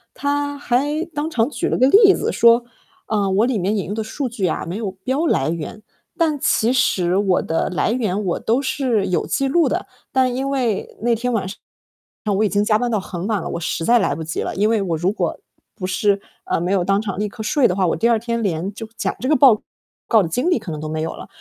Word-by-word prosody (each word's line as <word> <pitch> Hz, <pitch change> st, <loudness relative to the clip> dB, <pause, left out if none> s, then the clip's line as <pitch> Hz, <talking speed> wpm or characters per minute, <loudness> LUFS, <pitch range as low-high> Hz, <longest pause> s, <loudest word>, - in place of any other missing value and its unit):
他 285 Hz, 0 st, -1 dB
还 290 Hz, +6 st, 0 dB
当 300 Hz, +2 st, -2 dB
场 230 Hz, -6 st, +1 dB
举 235 Hz, -, -2 dB
了 -, -, 0 dB
个 255 Hz, -, +4 dB
例 395 Hz, +3 st, +7 dB
子 -, -, -1 dB
说， 235 Hz, +1 st, +5 dB, 0.4 s
啊， 205 Hz, -3 st, 0 dB
我 200 Hz, +5 st, +3 dB
里 245 Hz, -5 st, 0 dB
面 200 Hz, +4 st, 0 dB
引 195 Hz, -, -2 dB
用 200 Hz, -, -4 dB
的 220 Hz, 0 st, -2 dB
数 265 Hz, +5 st, -3 dB
据 225 Hz, -6 st, -2 dB
啊， 160 Hz, -, -2 dB
没 170 Hz, -, -5 dB
有 210 Hz, -2 st, -3 dB
标 260 Hz, -, -2 dB
来 145 Hz, -, +1 dB
源。 170 Hz, +6 st, -6 dB, 0.3 s
但 315 Hz, -4 st, +1 dB
其 230 Hz, -2 st, +2 dB
实 190 Hz, -8 st, +2 dB
我 195 Hz, -3 st, +2 dB
的 165 Hz, -, -1 dB
来 185 Hz, +3 st, 0 dB
源， 210 Hz, -4 st, -1 dB
我 180 Hz, -, -1 dB
都 235 Hz, +4 st, +1 dB
是 250 Hz, -8 st, 0 dB
有 180 Hz, -, -1 dB
记 275 Hz, -1 st, 0 dB
录 335 Hz, +3 st, +3 dB
的。 -, -, -2 dB, 0.3 s
但 260 Hz, -2 st, +2 dB
因 265 Hz, +2 st, -2 dB
为 250 Hz, -7 st, -1 dB
那 235 Hz, +1 st, +2 dB
天 245 Hz, +2 st, -1 dB
晚 205 Hz, -5 st, 0 dB
上， 195 Hz, -, -8 dB, 0.8 s
我 215 Hz, -, +3 dB
已 -, -, +3 dB
经 205 Hz, +1 st, +1 dB
加 215 Hz, 0 st, +3 dB
班 245 Hz, -, 0 dB
到 215 Hz, -4 st, 0 dB
很 180 Hz, 0 st, -5 dB
晚 215 Hz, -4 st, 0 dB
了， -, -, -5 dB
我 -, -, -3 dB
实 165 Hz, -, -2 dB
在 240 Hz, +6 st, +4 dB
来 140 Hz, -, 0 dB
不 160 Hz, -, -5 dB
及 160 Hz, -, -4 dB
了。 -, -, -4 dB
因 210 Hz, +3 st, +2 dB
为 225 Hz, -2 st, +2 dB
我 175 Hz, -4 st, -1 dB
如 175 Hz, +4 st, 0 dB
果 210 Hz, -, -2 dB, 0.4 s
不 185 Hz, -, -5 dB
是 200 Hz, +1 st, +1 dB, 0.2 s
呃， -, -, -1 dB
没 175 Hz, +2 st, -1 dB
有 190 Hz, -3 st, +1 dB
当 195 Hz, +2 st, +2 dB
场 195 Hz, -3 st, -4 dB
立 210 Hz, -, 0 dB
刻 220 Hz, +2 st, -8 dB
睡 265 Hz, +2 st, +3 dB
的 180 Hz, -, -1 dB
话， 190 Hz, -1 st, +1 dB
我 -, -, 0 dB
第 230 Hz, -, +2 dB
二 235 Hz, -, +4 dB
天 235 Hz, +1 st, -2 dB
连 190 Hz, -1 st, -2 dB
就 225 Hz, +1 st, -7 dB
讲 -, -, -2 dB
这 255 Hz, -, -3 dB
个 305 Hz, -, +4 dB
报 250 Hz, -6 st, +6 dB, 0.5 s
告 220 Hz, -4 st, +4 dB
的 165 Hz, -, -3 dB
精 250 Hz, -, 0 dB
力 350 Hz, -, +3 dB
可 185 Hz, -, -6 dB
能 155 Hz, -, -5 dB
都 155 Hz, -, -5 dB
没 155 Hz, 0 st, -3 dB
有 160 Hz, -, -3 dB
了。 -, -, -9 dB
215 Hz, 275 characters per minute, -20 LUFS, 190-255 Hz, 0.8 s, 例